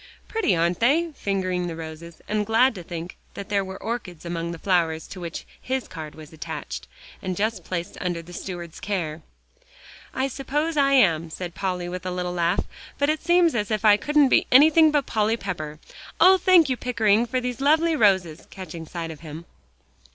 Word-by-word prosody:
"Pretty, 435 - +1
aren't 170 +1 +1
they?" 320 +8 +2
fingering 185 -6 -2
the 165 - -5
roses, 160 +1 -9
and 210 0 0
glad 230 +4 +3
to 190 - -8
think 170 +1 -7 0.2
that 200 - -7
there 200 -1 +1
were 190 0 -7
orchids 210 -8 -5
among 170 0 -3
the 170 - -5
flowers 165 -3 0
to 190 - -9
which 170 -1 -6 0.2
his 260 0 -2
card 155 -2 -8
was 155 0 -12
attached, 60 - -6 0.3
and 185 -1 -3
just 220 +2 -1
placed 175 -2 -5
under 175 -2 -2
the 175 +2 -13
steward's 175 -3 -7
care. 170 -6 -3 0.9
"I 260 +1 -1
suppose 295 +5 -2
I 275 -1 +3
am," 170 - +4
said 175 +1 -6
Polly, 180 -2 -3
with 180 0 -5
a 185 - -3
little 180 0 -3
laugh, 175 +1 +1 0.3
"but 285 +1 +2
it 310 - -3
seems 345 -1 +4
as 210 -4 -1
if 215 -1 -1
I 210 -1 +8
couldn't 290 +5 +3
be - - +3
anything 310 +4 +7
but 295 -3 +1
Polly 220 +1 +1
Pepper. 155 -7 -5 0.4
Oh! 380 0 +7
thank 355 -4 +6
you, 255 -2 -1
Pickering, 230 -2 +2
for 255 +2 -1
these 250 0 -4
lovely 315 +3 +3
roses," 190 - +2
catching 170 -4 -8
sight 165 -1 -5
of 155 - -10
him. 160 +1 -9
190 Hz, 190 wpm, -24 LUFS, 170-255 Hz, 0.9 s, I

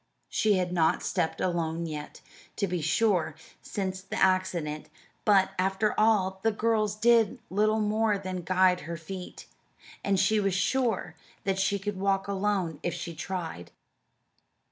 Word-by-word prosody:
She 215 -1 +2
had 180 -2 0
not 160 -2 +2
stepped 160 - -1
alone 170 -2 -1
yet, 150 -2 -7 0.3
to 200 - 0
be 180 -3 -2
sure, 165 -2 +1 0.3
since 190 -2 -4
the 195 - -7
accident, 185 -5 +1 0.4
but, 195 -3 +4
after 195 +3 +1
all, 195 -4 +2
the 225 - +2
girls 215 -1 +1
did 230 +1 +4
little 215 +3 +2
more 215 0 +2
than 185 -2 -4
guide 185 +1 +3
her 170 - -3
feet, 180 +3 -8 0.6
and 195 -1 +2
she 215 +3 +3
was 195 -3 +1
sure 225 -5 0 0.3
that 195 -1 0
she 200 +1 +2
could 200 0 -4
walk 195 0 +1
alone 195 -4 -1
if 175 - -2
she 170 - -5
tried. 165 - -5
190 Hz, 145 wpm, -28 LUFS, 175-210 Hz, 0.6 s, but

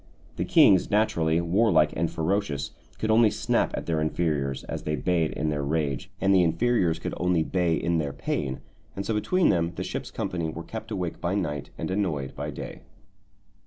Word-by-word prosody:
The - - -1
kings, 95 -2 +5
naturally 85 -6 +2
warlike 90 -2 +3
and 85 0 0
ferocious, 80 -4 -1 0.3
could 110 - 0
only 110 0 +6
snap - - +1
at - - -4
their 80 -2 0
inferiors 75 -4 -1
as - - -5
they 75 - -1
bayed 80 +2 +1
in 75 - -1
their 75 -1 -1
rage, 70 -1 -1
and 95 0 +3
the 95 - +6
inferiors 85 0 +2
could 80 - -5
only 90 -2 +2
bay 85 -1 +1
in 85 0 0
their 70 -3 -2
pain, 70 -1 -3 0.3
and 100 - -4
so 115 - -1
between 175 - +2
them 85 0 +1
the - - -3
ship's - - -4
company 85 -4 -3
were 85 +1 -6
kept 110 +3 -7
awake 90 -6 -4
by 90 +3 0
night 75 -7 -2
and - - -3
annoyed 85 -9 -1
by - - -4
day. - - -7
85 Hz, 190 wpm, -26 LUFS, 80-95 Hz, 0.3 s, only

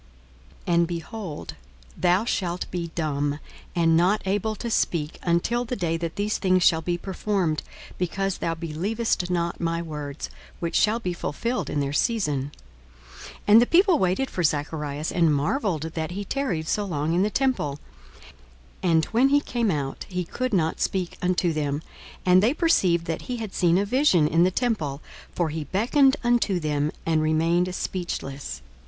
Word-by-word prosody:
42:001:020 175 - 0
And, 170 0 +4
behold, 175 0 -6 0.4
thou 180 +4 +2
shalt 180 -6 -1
be 170 -2 -3
dumb, 145 -3 -1 0.4
and 165 -2 +4
not 185 +6 +3
able 205 +3 0
to 235 +2 -5
speak, 160 -7 0
until 175 +8 +1
the 245 +1 -3
day 170 -6 -1
that 165 0 -4
these 205 +1 -1
things 185 -2 +3
shall 160 -1 +4
be 175 +2 -1
performed, 190 -3 -1 0.4
because 195 +2 -1
thou 165 0 -1
believest 180 +5 -1
not 170 -1 -1
my 165 0 0
words, 150 -3 -6 0.3
which 170 -1 -3
shall 220 +2 +3
be 180 -6 -2
fulfilled 235 +9 -2
in 145 - 0
their 140 0 -2
season. 150 - 0 0.7
42:001:021 - - -10 0.2
And 220 +3 +9
the - - +5
people 365 0 +4
waited 190 +9 +1
for 180 - -2
Zacharias, 150 -1 -1
and 165 -3 +3
marvelled 160 - 0
that 160 -1 -3
he 200 +3 -5
tarried 185 - -2
so 210 - 0
long 160 -4 -1
in 175 - +2
the 205 - +2
temple. 215 - 0 1.0
42:001:022 180 - +1
And 160 -1 +3
when 245 +4 +3
he 285 +1 +5
came 235 -6 -1
out, 145 -6 -2
he 180 -1 -2
could 255 +8 -3
not 165 -5 0
speak 185 -3 -1
unto 180 -1 +1
them: 145 0 -2 0.4
and 185 0 +6
they 235 +8 +2
perceived 185 - +3
that 165 -1 -3
he 250 - -1
had 220 -4 -6
seen 175 -1 +3
a 200 - +2
vision 205 - +3
in 165 +3 +4
the - - +4
temple: 185 - -1 0.3
for 175 -3 -1
he 155 0 -4
beckoned 265 - +3
unto 240 -6 +2
them, 150 -1 0
and 160 -1 +2
remained 165 +3 +1
speechless. 140 - -4
175 Hz, 170 wpm, -25 LUFS, 160-210 Hz, 1.0 s, And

